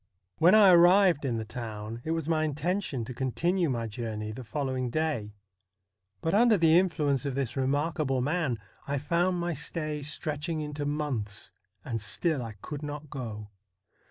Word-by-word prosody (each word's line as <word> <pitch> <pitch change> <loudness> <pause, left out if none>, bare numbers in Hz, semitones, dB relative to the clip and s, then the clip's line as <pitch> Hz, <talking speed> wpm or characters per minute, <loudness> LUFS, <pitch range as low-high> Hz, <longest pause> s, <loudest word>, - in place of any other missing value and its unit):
When 175 +5 +7
I 205 -3 +8
arrived 175 -2 +6
in 120 -4 0
the 110 - -3
town, 110 0 -6
it - - -5
was 165 -2 -1
my 160 -1 +2
intention 150 - -1
to 125 - -6
con 130 +1 -2
tinue 175 -1 +1
my 120 -3 -1
journey 110 -1 -4
the 125 +4 -7
following 130 +2 -2
day, 120 -8 -2 0.9
but 165 - 0
under 225 +1 +5
the 165 -2 +5
influence 150 -7 +1
of 140 -3 -3
this 130 -4 -2
remarkable 140 +1 0
man, 145 -2 0 0.3
I 140 0 0
found 175 +5 +1
my 175 0 -1
stay 155 0 -3
stretching 155 +2 -3
into 150 -1 -3
months, 125 -9 -3 0.3
and 115 -3 -3
still 150 - 0
I 115 -2 -6
could 150 -2 -5
not 150 0 -6
go. 110 -6 -6
145 Hz, 165 wpm, -29 LUFS, 125-165 Hz, 0.9 s, I